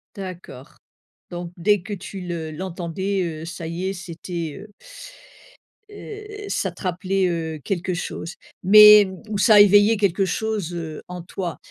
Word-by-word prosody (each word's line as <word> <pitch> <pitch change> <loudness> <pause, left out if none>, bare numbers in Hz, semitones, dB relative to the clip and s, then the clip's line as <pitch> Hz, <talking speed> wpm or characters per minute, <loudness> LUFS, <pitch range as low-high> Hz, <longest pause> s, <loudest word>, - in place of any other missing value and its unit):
D'accord 185 -9 -9 0.5
donc 175 0 -6
dès 205 +2 +2
que 205 +2 -7
tu 195 0 -7
le 170 -3 -5
l'entendais, 185 +3 -3 0.2
heu, - - -7
ça 170 -1 -7
y 170 +3 -4
est, 195 - -2
c'était, 170 -3 -6
heu 210 -1 -14 1.2
heu, 420 +1 -9 0.2
ça - - -2
te - - -16
rappelait, 185 +1 0
heu, 160 -2 -3
quelque 185 -1 -2
chose. 175 -1 -5 0.3
Mais, 210 +2 +9
hem, 190 -2 -4
ou 210 - -2
ça 210 0 +7
éveillait 205 +2 +5
quelque 195 -1 +1
chose, 210 -3 -2
heu, 160 -3 -6
en 180 -1 -7
toi. 175 -1 -5
185 Hz, 155 wpm, -22 LUFS, 170-200 Hz, 1.2 s, Mais